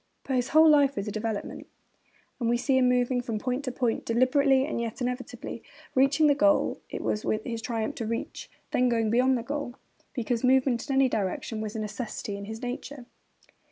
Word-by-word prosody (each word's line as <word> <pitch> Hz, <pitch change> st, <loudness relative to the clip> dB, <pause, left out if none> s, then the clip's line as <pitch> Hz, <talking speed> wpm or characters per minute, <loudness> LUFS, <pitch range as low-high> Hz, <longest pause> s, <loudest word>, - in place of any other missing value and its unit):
But 265 Hz, -, -2 dB
his 250 Hz, 0 st, 0 dB
whole 315 Hz, +2 st, +6 dB
life 285 Hz, -2 st, +5 dB
was 200 Hz, -2 st, -3 dB
a -, -, -2 dB
development; 215 Hz, 0 st, -4 dB, 0.7 s
and 235 Hz, -2 st, 0 dB
we 240 Hz, -, +3 dB
see 260 Hz, +2 st, +2 dB
him 250 Hz, -1 st, +4 dB
moving 250 Hz, 0 st, +2 dB
from 230 Hz, -3 st, -3 dB
point 255 Hz, +5 st, -2 dB
to 255 Hz, -, -2 dB
point, 245 Hz, -2 st, -1 dB
deliberately, 265 Hz, +3 st, +3 dB
and 290 Hz, -5 st, -3 dB
yet 230 Hz, -1 st, -4 dB
inevitably; 250 Hz, 0 st, -4 dB, 0.3 s
reaching 275 Hz, +4 st, +4 dB
the 290 Hz, -, +6 dB
goal 300 Hz, +1 st, +3 dB, 0.2 s
which -, -, -7 dB
it -, -, -3 dB
was 210 Hz, -, -1 dB, 0.2 s
his 230 Hz, -2 st, -4 dB
triumph 225 Hz, -2 st, -2 dB
to 225 Hz, -, -3 dB
reach, 230 Hz, +1 st, -4 dB, 0.2 s
then 250 Hz, 0 st, +2 dB
going 225 Hz, -2 st, +1 dB
beyond 255 Hz, +2 st, +3 dB
the 235 Hz, -, -4 dB
goal, 280 Hz, -2 st, -4 dB, 0.4 s
because 240 Hz, -1 st, -1 dB
movement 255 Hz, 0 st, +2 dB
in 270 Hz, -, +1 dB
any 270 Hz, 0 st, +5 dB
direction 215 Hz, 0 st, -2 dB
was 215 Hz, 0 st, -5 dB
a -, -, -2 dB
necessity 215 Hz, -1 st, -5 dB
of 200 Hz, -, -7 dB
his 220 Hz, +3 st, -7 dB
nature. 250 Hz, +1 st, -6 dB
245 Hz, 200 wpm, -27 LUFS, 225-265 Hz, 0.7 s, whole